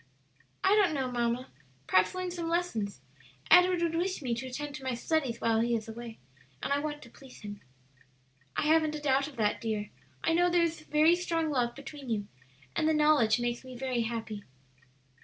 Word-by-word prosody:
"I - - +4
don't 400 -6 +4
know, 260 -2 -1
mamma; 240 +1 -1 0.3
perhaps 185 - +3
learn 365 -1 -3
some 340 -2 -3
lessons. 225 - -1 0.5
Edward 360 -1 +6
would 335 -1 0
wish 365 +3 -1
me 245 -2 0
to 240 +3 -4
attend 285 +3 -5
to 285 -2 -8
my 260 -2 -1
studies 255 -2 -1
while 225 -1 +2
he 235 +1 +2
is 220 -1 -3
away, 230 0 -8 0.5
and - - +1
I 285 - +2
want 295 0 -4
to 235 - -13
please 265 0 -15
him." 205 -1 -8 1.0
"I - - +2
haven't 310 0 +3
a - - -4
doubt 275 -1 +2
of 300 - -11
that, 215 -3 0
dear. 215 -2 -3 0.3
I 325 - +2
know 350 +1 +4
there 350 -1 +3
is 330 -1 -1
very 310 +2 +4
strong 330 -3 -1
love 245 -3 0
between 280 -1 -9
you, 210 -3 -1 0.5
and 310 - +2
the 315 - +3
knowledge 300 -7 +4
makes 240 0 -2
me 255 -1 -9
very 255 -2 -1
happy." 225 -2 -4
270 Hz, 195 wpm, -30 LUFS, 235-320 Hz, 1.0 s, Edward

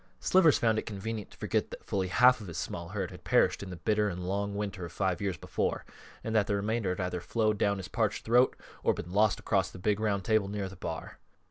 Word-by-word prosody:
Slivers 175 -5 +5
found 110 -2 +2
it - - -7
convenient 105 0 -5
to - - -17
forget - - -1
that - - -10
fully 95 -2 -1
half 125 +6 +5
of 105 - -8
his 85 - -6
small 85 0 -4
herd 95 -2 -3
had - - -12
perished - - +3
in 100 - -6
the 90 - -6
bitter 105 +4 +1
and 90 -1 -5
long 100 +1 -1
winter 100 -2 -3
of 85 - -6
five 95 -2 -1
years 95 -4 -1
before, - - -2 0.4
and 110 - -3
that 105 -3 +3
the 100 - +1
remainder 105 0 -1
had - - -11
either 90 -1 -2
flowed 110 +1 0
down 100 0 +2
his 95 -1 -6
parched 110 -3 -1
throat 120 +3 +4 0.3
or - - +2
been 90 - -7
lost 105 0 +3
across 95 -3 +1
the - - -11
big 105 +3 0
round 100 -4 0
table 110 -3 +2
near 100 -1 -3
the 95 - -10
bar. 80 -3 -6
100 Hz, 245 wpm, -30 LUFS, 95-110 Hz, 0.4 s, Slivers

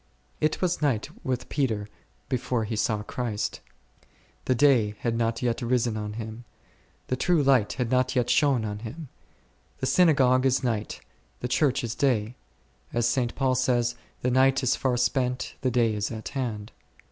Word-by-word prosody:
It 155 +4 0
was 180 -2 0
night 130 -7 0
with 125 -1 -2
Peter 110 -8 -1 0.4
before 125 -3 -1
he 110 +1 -3
saw 105 0 0
Christ. 110 -2 -3 0.9
The 130 - +2
day 115 -6 +4
had 115 -1 0
not 115 +1 -1
yet 120 -2 0
risen 120 -2 +1
on 105 -1 -4
him; 110 +1 -7 0.6
the 130 - -1
true 165 +3 +2
light 130 -6 +3
had 125 -1 -2
not 130 0 +2
yet 125 -2 +2
shone 140 -6 +3
on 105 -1 -4
him. 130 +7 -8 0.7
The - - -3
Synagogue 130 -6 +4
is 130 0 +2
night, 110 -4 -2 0.4
the 125 - -1
Church 135 +1 +1
is 115 -1 -2
day; 120 -3 0 0.6
as 120 0 +1
St. 120 -1 0
Paul 130 -2 +1
says, 120 -2 +1 0.3
The 125 - +1
night 130 +1 +3
is 130 - +3
far 130 -2 0
spent, 125 +1 0
the 130 - +1
day 115 -2 +2
is 105 -1 -2
at 110 -2 -6
hand. 115 -6 -4
125 Hz, 170 wpm, -26 LUFS, 115-130 Hz, 0.9 s, day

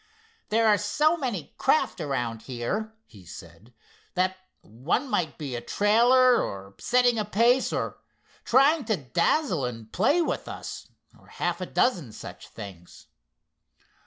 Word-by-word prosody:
"There 225 +1 +3
are 210 -1 +4
so 300 +10 +2
many 245 - -4
craft 305 - +1
around 120 -6 -2
here," 190 - -4
he 100 -5 -16
said, 85 - -13 0.4
"that 185 +1 +1 0.3
one 130 - -2
might 175 -10 -1
be 140 -5 -5
a 120 - -4
trailer, 240 - +4
or 100 0 -6
setting 245 -2 +3
a - - +1
pace, 235 +5 +2
or - - -3 0.4
trying 275 +5 +4
to 220 -3 0
dazzle 170 - 0
and 115 -3 -5
play 280 - +3
with 340 - -1
us, - - -7 0.3
or - - -22
half - - -3
a - - -3
dozen 170 - 0
such - - -10
things." 90 -4 -12
195 Hz, 140 wpm, -26 LUFS, -, 0.4 s, are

